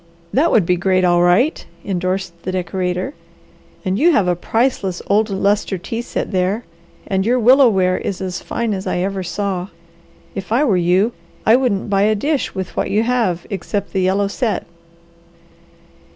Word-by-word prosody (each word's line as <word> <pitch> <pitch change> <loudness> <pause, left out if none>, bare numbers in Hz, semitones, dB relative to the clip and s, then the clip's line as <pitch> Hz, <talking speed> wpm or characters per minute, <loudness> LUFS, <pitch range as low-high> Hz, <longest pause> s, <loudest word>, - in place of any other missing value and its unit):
"That 300 +6 +3
would 210 -6 +4
be 180 +1 +2
great, 185 +1 +2
all 175 -1 +4
right!" 180 - +3 0.2
endorsed 185 -2 -2
the 185 - -4
decorator. 185 - -2 0.7
"And 190 +2 0
you 345 +4 +5
have 210 - +3
got 180 - +2
a - - 0
priceless 200 -1 -1
old 210 +2 +2
lustre 200 0 0
tea 225 +6 -4
set 240 - -4
there, 190 +4 0 0.4
and 190 -1 0
your 240 +5 +2
willow 255 +2 +6
ware 185 -3 +1
is 190 - -4
as 185 -2 -4
fine 235 -2 -2
as 190 -1 -4
I - - -1
ever 190 +2 -1
saw. 185 0 -3 0.7
If 195 +1 -6
I 245 +6 +3
were 225 -10 +3
you, 180 +5 +2 0.3
I 220 - +6
wouldn't 245 -7 0
buy 195 -1 +3
a 215 +1 +3
dish 285 +6 -1
with 190 -1 -5
what - - -1
you 215 +2 +2
have, 225 -8 0
except 200 +2 -3
the 190 - +1
yellow 195 +2 +2
set." 220 +2 -2
195 Hz, 180 wpm, -19 LUFS, 185-225 Hz, 0.7 s, willow